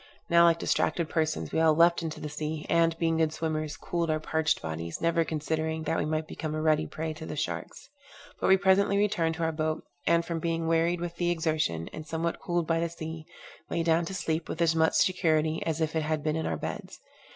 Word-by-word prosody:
Now, 170 0 +7
like 165 -1 +5
distracted 165 -1 0
persons, 160 -2 -1
we - - 0
all 160 -1 +5
leapt 170 +2 +5
into 160 -2 -4
the - - -5
sea, 150 +1 -4
and, 165 -1 +3
being 165 -1 +1
good 160 -1 +2
swimmers, 155 -1 -3
cooled 170 -1 -2
our 155 0 +1
parched 160 0 0
bodies, 80 +1 -5
never 165 0 +2
considering 160 0 -2
that 160 - 0
we - - 0
might 155 0 -1
become 155 -1 -4
a 155 - -2
ready 155 0 +2
prey 160 0 -4
to 160 +1 -9
the - - -5
sharks. 150 - -4 0.5
But - - 0
we 190 - +7
presently 195 +1 +3
returned 195 -6 +1
to 165 - -3
our 165 - +1
boat, 155 0 -2 0.2
and 170 0 +3
from 165 -1 -3
being 165 0 -1
wearied 165 +1 +2
with 170 -1 -5
the 175 0 +1
exertion, 155 - 0
and 155 0 -8
somewhat 165 +2 -2
cooled 175 -1 -1
by 165 0 +1
the 170 0 0
sea, 160 -1 -7 0.4
lay 170 - 0
down 165 0 +2
to 190 - -5
sleep 160 -2 -2
with - - -4
as 165 -1 +3
much 160 0 +3
security 160 -4 +2
as 160 0 -1
if 160 0 -1
it 160 - +2
had 155 -1 -1
been 155 0 0
in 160 - -1
our 80 - -1
beds. - - -6
160 Hz, 230 wpm, -28 LUFS, 155-170 Hz, 0.5 s, Now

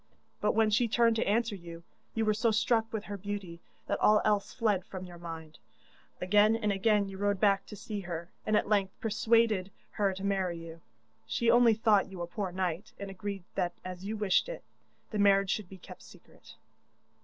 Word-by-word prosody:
But 210 - +1
when 220 -1 +3
she 230 +3 +3
turned 230 0 +3
to 225 - 0
answer 225 +2 +1
you, 170 -3 -9 0.3
you 225 -1 +1
were 215 - +3
so 225 +2 +1
struck 225 +1 +1
with 220 -2 -3
her 205 0 -6
beauty 195 -3 -6 0.3
that - - -1
all 210 0 +5
else 210 -2 +1
fled 210 -6 0
from 185 0 -8
your 175 -1 -11
mind. 160 -2 -8 0.6
Again 210 +4 +4
and 210 -2 0
again 200 +1 +2
you 195 -1 -8
rode 205 -1 +1
back 195 -1 +2
to 210 - -9
see 210 +1 -5
her, 170 -2 -6
and 215 -1 +2
at - - 0
length 200 -2 0
persuaded 220 -3 +2 0.2
her 200 -2 +1
to 190 - -7
marry 190 -3 0
you. 165 0 -10 0.5
She 230 - +2
only 240 -2 +6
thought 210 -3 +3
you 185 -2 -6
a - - -2
poor 190 +2 -4
knight, 180 +1 -3
and 200 -1 -6
agreed 195 -1 -5
that 175 -2 -1
as 185 0 -7
you 215 +2 -4
wished 205 - +2
it, - - -7 0.5
the 210 - -2
marriage 195 -1 +4
should 205 -5 -3
be 190 - -10
kept 180 - -12
secret. - - -17
200 Hz, 200 wpm, -30 LUFS, 185-215 Hz, 0.6 s, only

